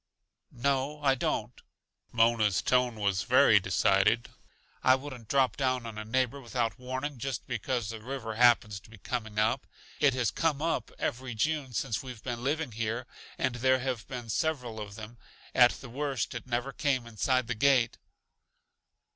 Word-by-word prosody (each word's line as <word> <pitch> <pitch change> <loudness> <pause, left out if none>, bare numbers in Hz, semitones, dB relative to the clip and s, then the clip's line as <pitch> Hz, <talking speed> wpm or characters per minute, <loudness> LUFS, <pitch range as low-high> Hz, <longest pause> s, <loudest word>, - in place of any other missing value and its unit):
"No, 140 +3 0
I 135 -2 +5
don't." - - -2 0.5
Mona's 115 -4 +3
tone 125 -2 +2
was 100 -3 0
very - - +6
decided. - - +2 0.5
"I 130 - +6
wouldn't 130 -4 -8
drop 135 0 +2
down 130 -3 0
on 110 -2 -6
a - - -4
neighbor 130 +4 0
without 120 -3 -2
warning 130 +2 -4
just 135 +2 -3
because 120 -5 -2
the 110 -1 -7
river 120 -2 -5
happens 110 -3 +4
to 95 - -19
be 115 - -13
coming 110 0 -4
up. 110 +5 +1 0.3
It 140 -3 +4
has 125 -5 +1
'come 160 -4 0
up' 165 +2 -1
every 120 -1 -3
June 140 +2 -1
since 110 0 -1
we've 125 -4 -9
been 120 -2 -4
living 150 0 -1
here, 115 +2 -3 0.3
and 130 -2 0
there 130 +1 +3
have 125 -4 -3
been 120 -3 -6
several 125 -3 -1
of 105 -1 -7
them. 110 +2 -10 0.3
At 120 -1 +7
the 135 - -10
worst 135 +1 -2
it 120 +1 -7
never 125 +2 -2
came 130 -4 0
inside 125 +3 0
the 120 - -2
gate." 125 -1 +3
125 Hz, 165 wpm, -29 LUFS, 115-135 Hz, 0.5 s, At